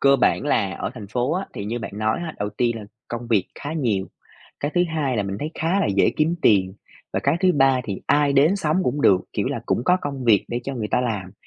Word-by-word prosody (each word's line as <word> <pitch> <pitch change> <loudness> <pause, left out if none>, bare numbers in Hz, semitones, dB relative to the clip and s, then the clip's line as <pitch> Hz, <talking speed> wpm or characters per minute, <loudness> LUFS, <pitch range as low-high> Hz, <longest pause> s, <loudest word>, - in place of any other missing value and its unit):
cơ 140 0 +5
bản - - +2
là 100 -9 +1
ở 95 - -4
thành 105 -4 -8
phố 125 +7 -1
á, 190 +2 -2
thì 100 - -5
như 115 +3 -3
bạn 110 - -6
nói 110 0 0
á, 160 - -5
đầu 105 0 -1
tiên 115 +2 0
là 105 - -8 0.2
công 120 0 -5
việc 105 -6 +2
khá 145 - -6
nhiều, 115 -12 0 0.5
cái 145 +1 -2
thứ 175 - +4
hai 135 -6 0
là 105 - +1
mình 95 0 -4
thấy 155 +2 -4
khá 170 +5 +1
là - - +1
dễ - - +4
kiếm 160 +3 +1
tiền, 95 -3 +3 0.4
và - - +1
cái 140 +3 +3
thứ 185 0 +4
ba 135 -2 +3
thì 100 -5 -5
ai 145 -1 +3
đến 150 +8 +4
sống 160 -3 0
cũng 145 +1 -1
được, 95 -7 +5
kiểu - - 0
là - - -2
cũng 120 - 0
có 180 +5 +4
công 140 -3 -4
việc 110 -5 +4
để 120 - -2
cho 135 - -4
người 110 -4 -3
ta - - +2
làm. 105 -7 -3
125 Hz, 265 wpm, -23 LUFS, 105-150 Hz, 0.5 s, cơ